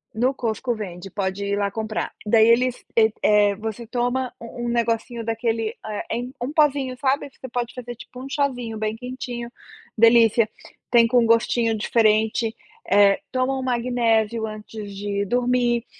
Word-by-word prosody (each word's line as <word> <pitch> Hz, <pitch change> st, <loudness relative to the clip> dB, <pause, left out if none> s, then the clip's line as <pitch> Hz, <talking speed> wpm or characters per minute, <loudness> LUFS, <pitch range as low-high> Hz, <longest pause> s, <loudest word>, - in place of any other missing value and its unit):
No 255 Hz, +4 st, +2 dB
Costco 240 Hz, 0 st, -2 dB
vende. 190 Hz, -3 st, -7 dB
Pode 200 Hz, 0 st, -2 dB
ir 200 Hz, 0 st, 0 dB
lá 200 Hz, -1 st, 0 dB
comprar. 215 Hz, +1 st, -3 dB
Daí 220 Hz, +1 st, +5 dB
eles 250 Hz, +2 st, +2 dB
e 220 Hz, -1 st, +5 dB
eh, 205 Hz, -1 st, +4 dB
você 220 Hz, +2 st, -5 dB
toma 245 Hz, +2 st, -1 dB
um 240 Hz, +1 st, -6 dB
um -, -, -1 dB
negocinho 235 Hz, 0 st, -1 dB
daquele, 225 Hz, 0 st, -1 dB
eh, 210 Hz, -1 st, -4 dB
em 250 Hz, +2 st, -5 dB
um 255 Hz, +4 st, -2 dB
pozinho, 280 Hz, -4 st, +2 dB
sabe? 275 Hz, +1 st, 0 dB
Você 260 Hz, -, -11 dB
pode 240 Hz, -1 st, -3 dB
fazer 240 Hz, -1 st, -7 dB
tipo 250 Hz, +2 st, -11 dB
um -, -, -6 dB
chazinho 250 Hz, -6 st, -2 dB
bem 215 Hz, 0 st, -2 dB
quentinho. 245 Hz, -1 st, -6 dB, 0.5 s
Delícia. 230 Hz, -1 st, +5 dB, 0.4 s
Tem 235 Hz, -1 st, +6 dB
com 245 Hz, +1 st, +4 dB
um -, -, +2 dB
gostinho 230 Hz, 0 st, +2 dB
diferente. 220 Hz, +1 st, +2 dB, 0.4 s
Eh, 200 Hz, -1 st, +5 dB
toma 260 Hz, +1 st, 0 dB
um -, -, -3 dB
magnésio 235 Hz, -3 st, +1 dB
antes 210 Hz, -1 st, -8 dB
de 200 Hz, 0 st, -2 dB
dormir. 245 Hz, +1 st, +1 dB
230 Hz, 160 wpm, -23 LUFS, 215-245 Hz, 0.5 s, Tem